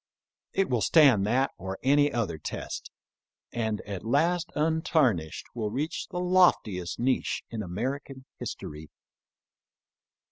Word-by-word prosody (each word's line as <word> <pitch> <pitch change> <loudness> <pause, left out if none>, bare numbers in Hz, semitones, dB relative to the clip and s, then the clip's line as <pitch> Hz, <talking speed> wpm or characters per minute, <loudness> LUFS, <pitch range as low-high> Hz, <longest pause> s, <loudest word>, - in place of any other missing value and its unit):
It 195 0 +2
will 120 -4 0
stand 130 -11 +5
that 130 +5 +2
or 95 +2 -5
any 145 +2 +4
other 100 - -2
test, - - -6 0.6
and 110 -3 -1
at 100 -4 -6
last 165 +8 +1
untarnished 150 - +1
will 110 -3 -2
reach 140 +9 -3
the - - -6
loftiest 175 - +2
niche 130 +2 0
in 115 -2 -3
American 130 +8 -4
history. 75 +1 -7
125 Hz, 115 wpm, -28 LUFS, 100-150 Hz, 0.6 s, stand